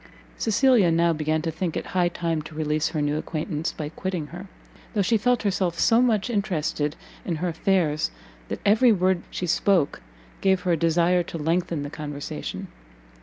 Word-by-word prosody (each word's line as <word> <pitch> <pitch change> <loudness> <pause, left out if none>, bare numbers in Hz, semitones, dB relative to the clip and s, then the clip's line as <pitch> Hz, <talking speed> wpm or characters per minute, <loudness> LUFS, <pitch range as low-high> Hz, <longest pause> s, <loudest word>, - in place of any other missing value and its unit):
Cecilia 225 -3 +4
now 170 +1 +3
began 155 0 -1
to 165 - -1
think 165 +1 -3
it - - -4
high 180 -1 +3
time 165 -2 -2
to 150 +1 -11
release 155 0 0
her 150 -2 -2
new 145 +1 0
acquaintance 155 0 -3
by 150 -2 -5
quitting 180 -1 -3
her, 180 +3 -8 0.5
though 205 - +3
she 225 - +2
felt 245 +2 +2
herself 185 -4 0
so 230 +1 +4
much 225 -4 +2
interested 165 -9 -1 0.3
in 170 - -2
her 175 +3 -1
affairs, 165 -3 +1 0.4
that - - -5
every 220 +4 +5
word 185 -3 +2
she 180 - -3
spoke 175 -2 +2 0.4
gave 190 -1 +3
her 180 - 0
a - - +4
desire 170 +2 +3
to 170 - -6
lengthen 165 0 -1
the 145 - -6
conversation. 145 -2 -6
170 Hz, 175 wpm, -25 LUFS, 155-195 Hz, 0.5 s, every